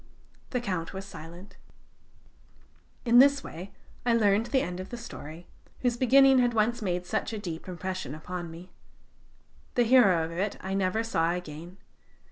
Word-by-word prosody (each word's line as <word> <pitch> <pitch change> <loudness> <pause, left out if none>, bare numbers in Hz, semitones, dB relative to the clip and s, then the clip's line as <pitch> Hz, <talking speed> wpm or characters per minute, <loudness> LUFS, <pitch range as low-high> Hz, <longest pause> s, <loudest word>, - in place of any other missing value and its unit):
The 250 - -1
Count 185 -8 -3
was 190 0 -6
silent. 175 +2 -11 1.5
In 240 0 +6
this 280 +1 +5
way 180 +5 -8 0.3
I 240 -1 +3
learned 210 0 +3
the 265 -2 +1
end 180 0 -5
of 185 - -7
the 240 - -6
story, 170 -8 -9 0.4
whose 245 -2 +1
beginning 265 +2 +6
had 245 -1 +2
once 225 +2 +1
made 180 -3 -2
such 220 +4 -2
a - - -3
deep 175 -5 -6
impression 185 -4 -5
upon 175 +2 -6
me. 170 +3 -11 1.0
The 245 - +4
hero 220 -9 +5
of 165 - -7
it 190 +5 -2
I 190 +1 -4
never 195 +3 0
saw 170 -7 +1
again. 175 +1 -7
195 Hz, 160 wpm, -28 LUFS, 175-235 Hz, 1.5 s, In